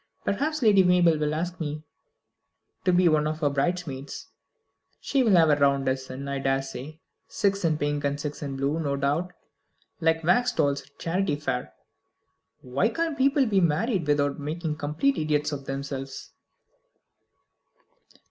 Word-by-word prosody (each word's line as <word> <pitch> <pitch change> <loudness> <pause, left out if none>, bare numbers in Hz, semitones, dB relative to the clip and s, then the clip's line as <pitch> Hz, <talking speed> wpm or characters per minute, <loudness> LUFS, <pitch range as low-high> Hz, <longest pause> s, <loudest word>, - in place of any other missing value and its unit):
Perhaps 295 +7 -1
Lady 205 -4 +6
Mabel 175 -3 +4
will 150 0 0
ask 175 +3 -3
me 150 -1 -4 1.0
to 185 - +4
be 180 0 +4
one 155 -2 +3
of 155 +1 -4
her 145 -2 +2
bridesmaids. 140 -2 -3 0.7
She 275 - 0
will 225 -5 +3
have 165 -3 +5
a - - +5
round 140 -1 +2
dozen, 130 +1 -3
I 140 0 -2
daresay. 135 +2 -3 0.3
Six 200 -1 0
in 160 -2 +2
pink, 145 0 -1
and 140 0 -1
six 145 0 -5
in 140 -2 -4
blue, 140 +4 -1
no 140 -3 -1
doubt, 145 +6 -1 0.7
like 165 0 +1
wax 190 +10 +3
dolls 140 -1 +1
at - - -20
a 140 - -39
charity 180 -1 -1
fair. 145 -4 -4 0.9
Why 135 - 0
can't 325 +5 -2
people 275 0 +3
be 200 -4 +2
married 175 - +1
without 145 -1 +1
making 155 +2 -3
idiots 155 - 0
of 140 -2 -5
themselves?" 135 0 -6
150 Hz, 150 wpm, -26 LUFS, 140-180 Hz, 1.0 s, Lady